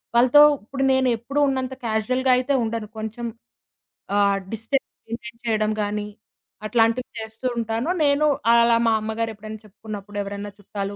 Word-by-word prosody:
వాళ్ళతో 250 +5 +7 0.2
ఇప్పుడు 270 +5 -3
నేను 260 0 +2
ఎప్పుడూ 270 +6 -3
ఉన్నంత 260 -1 -1
క్యాజుయల్‌గా 255 +4 +1
అయితే 255 +3 0
ఉండను. 225 -1 -3
కొంచెం. 220 +2 -5 0.9
ఆహ్, 200 -1 +3
డిస్టెన్స్ 225 +5 -2 0.2
మెయింటైన్ 230 +1 -7
చేయడం 215 -2 +1
గానీ. 205 0 -2 0.6
అట్లాంటివి 230 +2 +2
చేస్తూ 220 +2 -9
ఉంటాను. 230 +5 -1
నేను 285 +1 +3 0.3
అలా 235 0 +5
మా 225 - +4
అమ్మగారు 220 +1 -2
ఎప్పుడైనా 215 +1 -9
చెప్పుకున్నప్పుడు 205 0 -9
ఎవరైనా 200 +1 -5
చుట్టాలు 200 0 -5
225 Hz, 135 wpm, -23 LUFS, 215-250 Hz, 0.9 s, వాళ్ళతో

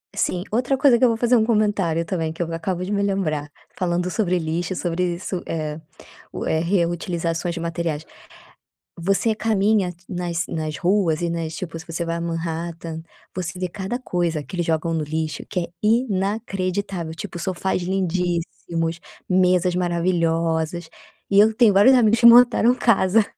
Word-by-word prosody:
Sim. 180 0 0
Outra 250 +4 +1
coisa 260 -3 +5
que - - -1
eu 250 - +7
vou 225 - 0
fazer 240 +1 +3
um 220 - +4
comentário 205 -7 +1
também, 165 -3 -2
que 165 - -7
eu 165 - -6
acabo 175 +2 -2
de 200 - -5
me 200 - +1
lembrar. 160 -8 -1 0.3
Falando 180 0 -1
sobre 185 -4 +1
lixo, 170 +3 -2
sobre 175 0 -1
isso, 180 0 -4
eh 155 -1 -3 0.5
o - - -5
eh, 160 - +1
reutilizações 170 -1 -1
de 170 - -5
materiais. 165 -2 -3 0.9
Você 195 +5 +1
caminha 215 -3 +1
t 175 +1 -26
nas 175 -2 -2
nas 155 -2 -4
ruas 175 -2 +1
e 170 - 0
nas 165 -1 -3
tipo, 165 -1 -6
se 160 - -11
você 170 +1 -3
vai 165 0 -2
a - - -4
Manhattan, 165 0 -4 0.3
você 180 0 -4
vê 180 -1 -2
cada 200 +6 -4
coisa 175 - -1
que 185 - -11
eles 175 - -1
jogam 165 0 0
no 160 - 0
lixo 155 +1 -3
que 180 - -1
é 170 - -3 0.2
inacreditável. 195 -5 -1
Tipo, 175 - -7
sofás 185 +1 -1
lindíssimos, 175 -2 -2 0.3
mesas 180 -1 +3
maravilhosas. 170 -2 0 0.4
E 200 - +6
eu 220 +1 +5
tenho 225 -3 +5
vários 210 +7 +7
amigos 230 -2 +4
que 235 - +7
montaram 240 0 +7
casa, 220 -3 +3
175 Hz, 170 wpm, -22 LUFS, 165-200 Hz, 0.9 s, eu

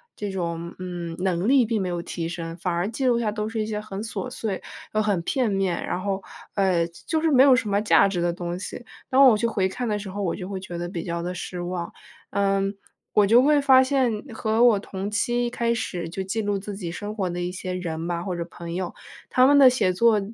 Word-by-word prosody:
这 205 -1 -4
种， 170 -2 -4
嗯， 175 -2 -5
能 185 0 0
力 265 0 +5
并 225 -1 0
没 190 - -1
有 175 -1 -2
提 170 -1 -4
升， 165 0 -6
反 180 0 -2
而 175 +4 -1
记 250 +4 -3
录 240 -2 +3
下 220 -3 0
都 210 0 -3
是 220 0 -2
一 215 - -2
些 210 -1 -2
很 205 -2 -6
琐 225 +3 -4
碎 210 -6 -4 0.3
又 215 - +3
很 205 -5 +1
片 240 +5 0
面， 195 -3 0
然 180 - -2
后 195 0 -2 0.3
呃， 185 -4 +2 0.2
就 320 -1 0
是 325 - +2
没 265 -3 +6
有 270 -2 +7
什 250 -5 -1
么 200 0 +2
价 205 -2 +5
值 195 -3 -2
的 175 0 +1
东 175 0 -4
西， 195 +5 -7 0.3
当 265 +1 +6
我 230 -4 +6
去 225 - -1
回 200 -5 +1
看 245 +5 -4
的 210 -1 0
时 200 -1 -7
候 200 +2 -4
我 175 - -1
就 185 -1 -7
会 195 -1 -4
觉 185 -2 -8
得 175 0 -4
比 170 -2 -4
较 170 -1 -3
地 180 +1 -4
失 180 0 -5
望。 175 -1 -4 0.4
嗯， 195 0 +1 0.4
我 210 - +5
就 235 +4 +7
会 295 +1 +4
发 265 -2 +6
现 260 -2 +2 0.2
和 220 +1 +1
我 235 -4 +6
同 195 0 -5
期 240 +3 +1
一 - - -1
开 235 -1 0
始 175 -7 -3
就 190 +3 -4
记 195 +4 -2
录 205 -1 0
自 200 +1 -6
己 180 -4 -5
生 205 +4 -6
活 190 -4 -1
的 175 0 -4
一 175 0 -2
些 185 0 -5
人 165 -2 -4
吧， 170 -1 -2
或 185 -2 -3
者 170 - -2
朋 170 0 -8
友， 180 0 -3 0.4
他 255 -1 +5
们 285 +2 +6
的 265 -2 +9
写 200 -7 +1
作 220 +3 +4
195 Hz, 270 characters per minute, -24 LUFS, 175-225 Hz, 0.4 s, 的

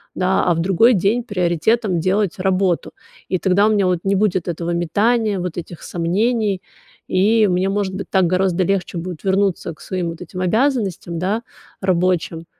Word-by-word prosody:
да, 185 +1 +1
а 175 - +3
в - - -2
другой 195 +8 +4
день 205 +6 +1
приоритетом 190 0 0
делать 190 +2 0
работу. 185 -2 0 0.4
И 185 - +1
тогда 190 +3 +3
у - - +2
меня 205 -2 +2
вот 180 -2 +1
не 195 0 +1
будет 190 -3 0
этого 170 0 -3
метания, 205 +5 +1
вот 180 -2 -4
этих 170 -1 -7
сомнений, 200 +3 0 0.5
и 210 +3 +3
мне 185 +1 +1
может 195 -1 -1
быть 195 - -6
так 190 -2 +3
гораздо 185 0 +1
легче 185 -1 -1
будет 170 -1 -6
вернуться 195 -3 0
к - - -28
своим 180 -3 -3
вот 165 - -8
этим 180 +1 -7
обязанностям, 200 - 0
да, 205 +6 -1 0.4
рабочим, 180 -3 0
185 Hz, 170 wpm, -19 LUFS, 175-205 Hz, 0.5 s, другой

